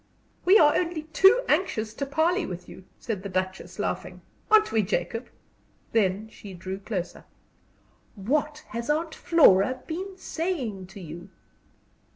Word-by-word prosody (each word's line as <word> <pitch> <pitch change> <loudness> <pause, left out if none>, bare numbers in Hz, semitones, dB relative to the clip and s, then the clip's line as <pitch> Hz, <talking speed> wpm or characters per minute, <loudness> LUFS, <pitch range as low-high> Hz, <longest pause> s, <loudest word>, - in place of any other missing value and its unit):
"We 380 +4 +7
are 295 -5 +5
only 335 -3 -1
too 385 +10 +5
anxious 225 - 0
to 280 - -4
parley 335 +6 +1
with 180 - -6
you," 185 - -12
said 220 -6 -4
the 200 - -6
Duchess, 185 0 -3
laughing. - - -4 0.3
"Aren't 435 0 +5
we, 220 - +3
Jacob?" 200 +4 -2 0.6
Then 205 -1 +1
she 200 -3 -11
drew 185 +2 -6
closer. 195 -3 -5 0.9
"What 295 +8 -1
has 235 +3 -5
Aunt 315 +2 0
Flora 255 - +4
been 375 +4 -5
saying 270 - -3
to 190 +2 -12
you?" 175 +2 -9
235 Hz, 140 wpm, -26 LUFS, -, 0.9 s, We